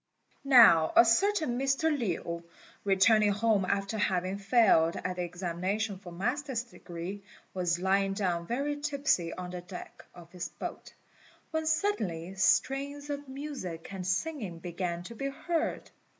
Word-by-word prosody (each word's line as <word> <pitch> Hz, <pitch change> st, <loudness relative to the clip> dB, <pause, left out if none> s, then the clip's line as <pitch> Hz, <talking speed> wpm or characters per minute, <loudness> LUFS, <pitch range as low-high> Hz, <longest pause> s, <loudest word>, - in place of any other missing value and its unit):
Now 220 Hz, -, +7 dB
a -, -, +8 dB
certain 310 Hz, -, +2 dB
Mr. 275 Hz, +4 st, +1 dB
Lin, 170 Hz, -, -3 dB, 0.4 s
returning 205 Hz, +2 st, +4 dB
home 210 Hz, -2 st, +2 dB
after 200 Hz, +3 st, -1 dB
having 185 Hz, 0 st, 0 dB
failed 195 Hz, -6 st, +4 dB
at 185 Hz, 0 st, -4 dB
the -, -, -1 dB
examination 185 Hz, +4 st, -2 dB
for 185 Hz, -3 st, -10 dB
Master's 245 Hz, -, -2 dB
degree, 185 Hz, -4 st, -8 dB, 0.3 s
was 175 Hz, -2 st, 0 dB
lying 195 Hz, +2 st, +1 dB
down 175 Hz, -4 st, -1 dB
very 285 Hz, +4 st, -1 dB
tipsy 280 Hz, -, 0 dB
on 180 Hz, -1 st, -6 dB
the 180 Hz, -1 st, -5 dB
deck 180 Hz, +1 st, -10 dB
of 170 Hz, -1 st, -13 dB
his 180 Hz, -1 st, -5 dB
boat, -, -, -8 dB, 0.6 s
when 320 Hz, -1 st, -1 dB
suddenly 215 Hz, -, -1 dB
strains 275 Hz, +9 st, +1 dB
of 285 Hz, 0 st, -5 dB
music 265 Hz, -, -6 dB
and 185 Hz, -2 st, -5 dB
singing 205 Hz, -, -2 dB
began 175 Hz, 0 st, -4 dB
to 205 Hz, -, -9 dB
be 275 Hz, +4 st, -3 dB
heard. 325 Hz, +4 st, -2 dB
200 Hz, 140 wpm, -30 LUFS, 180-270 Hz, 0.6 s, a